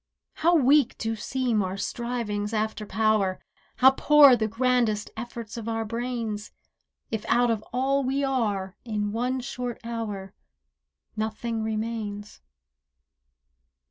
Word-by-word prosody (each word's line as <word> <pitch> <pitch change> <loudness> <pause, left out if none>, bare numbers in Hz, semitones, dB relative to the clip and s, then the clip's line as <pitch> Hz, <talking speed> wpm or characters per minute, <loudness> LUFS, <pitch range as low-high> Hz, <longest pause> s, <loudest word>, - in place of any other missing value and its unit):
How 340 +2 +4
weak 285 -2 +4
do 225 0 -2
seem 240 0 0
our 190 0 -3
strivings 230 -2 -3
after 215 0 -2
power, 215 -4 +1 0.4
How 265 +1 +7
poor 285 -1 +7
the 220 -2 0
grandest 230 -2 +1
efforts 230 -1 -7
of 230 0 -4
our 225 0 -1
brains, 230 -2 -4 0.6
If 220 -2 -2
out 240 0 +4
of 220 -2 -1
all 270 +3 +1
we 270 +2 0
are, 205 -8 -1
in 210 -3 -2
one 250 +4 -1
short 245 -1 -5
hour 210 -5 -5 0.8
Nothing 220 +1 -2
remains. 215 -1 -4
225 Hz, 120 wpm, -26 LUFS, 210-250 Hz, 0.8 s, How